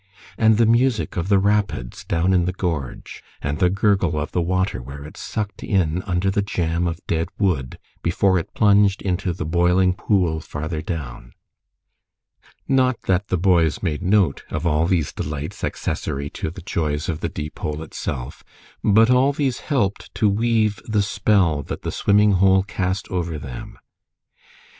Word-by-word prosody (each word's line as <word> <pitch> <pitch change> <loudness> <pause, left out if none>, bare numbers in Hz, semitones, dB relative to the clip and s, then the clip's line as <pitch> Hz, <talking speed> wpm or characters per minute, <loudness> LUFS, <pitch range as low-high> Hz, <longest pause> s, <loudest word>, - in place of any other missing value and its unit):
And 110 -1 +4
the 115 - +4
music 120 +1 +2
of 90 +2 -2
the 100 - +5
rapids 100 -11 0
down 85 +3 +1
in 90 -2 +3
the 90 - 0
gorge, 80 -8 -4 0.2
and 70 +1 -3
the 90 - +4
gurgle 95 -5 +1
of 75 - -4
the 90 - 0
water 95 -3 0
where 70 +3 -9
it 75 - -11
sucked 105 -2 -5
in 90 -3 +1
under 90 +1 +1
the 100 - +1
jam 85 -3 -1
of 85 0 -5
dead 80 0 -1
wood 85 -11 0 0.2
before 95 +2 +2
it 85 - -8
plunged 100 -2 +4
into 95 0 -1
the 85 -2 -4
boiling 90 +3 +3
pool 90 -5 +1
farther 80 +1 -5
down! 70 -7 -6 1.3
Not 130 -2 +2
that 95 +1 +1
the 95 - 0
boys 85 -3 +2
made 80 -3 -1
note 95 -5 +2
of 75 +2 -3
all 80 0 +2
these 85 -5 0
delights 75 0 -5
accessory 70 +1 -3
to - - -4
the 90 +2 -10
joys 75 -3 -2
of 80 - -2
the - - -2
Deepole 75 0 -5
itself, 65 -5 -6 0.4
but 110 +3 +5
all 130 +3 +4
these 135 -4 -1
helped 110 -10 -1
to 110 - +2
weave 110 0 +2
the 105 -2 +1
spell 100 -6 +2
that - - -7
the - - -2
swimming 105 +1 +3
hole 95 0 +4
cast 95 -1 -2
over 85 -3 -2
them. 65 -4 -8
90 Hz, 165 wpm, -22 LUFS, 80-100 Hz, 1.3 s, the